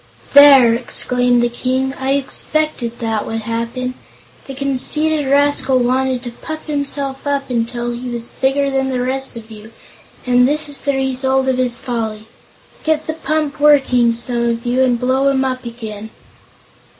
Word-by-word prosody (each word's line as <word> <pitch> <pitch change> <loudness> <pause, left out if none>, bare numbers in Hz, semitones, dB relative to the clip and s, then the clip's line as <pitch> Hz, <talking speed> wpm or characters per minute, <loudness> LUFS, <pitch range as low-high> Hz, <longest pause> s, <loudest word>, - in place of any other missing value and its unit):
"There!" 275 -5 +8
exclaimed 245 0 +2
the - - +3
King; 260 +2 -2
"I 265 +1 0
expected 280 -3 0
that 225 -2 -3
would 225 0 -3
happen. 230 +3 -4 0.5
The 270 - -7
conceited 285 +3 +1
rascal 280 -1 +2
wanted 255 0 0
to 240 - -6
puff 315 +6 -8
himself 280 -2 -2
up 275 -2 -2
until 240 0 -2
he 245 +1 -6
was 235 -1 -4
bigger 275 +1 0
than 265 0 0
the 255 -1 -2
rest 265 0 -2
of 225 -1 -11
you, 215 +1 -12 0.5
and 250 0 +4
this 300 +2 +1
is 290 -1 -3
the 280 -1 -1
result 265 0 0
of 255 -1 0
his 245 -1 0
folly. 225 -4 -4 0.6
Get 315 -1 0
the 315 - -3
pump 310 -2 -3
working, 265 -5 +4
some 235 0 -1
of 235 0 -3
you, 245 +2 +1
and 250 -2 +2
blow 260 +2 +1
him 265 -1 +1
up 255 -1 -3
again." 220 -2 -8
255 Hz, 160 wpm, -17 LUFS, 240-275 Hz, 0.6 s, There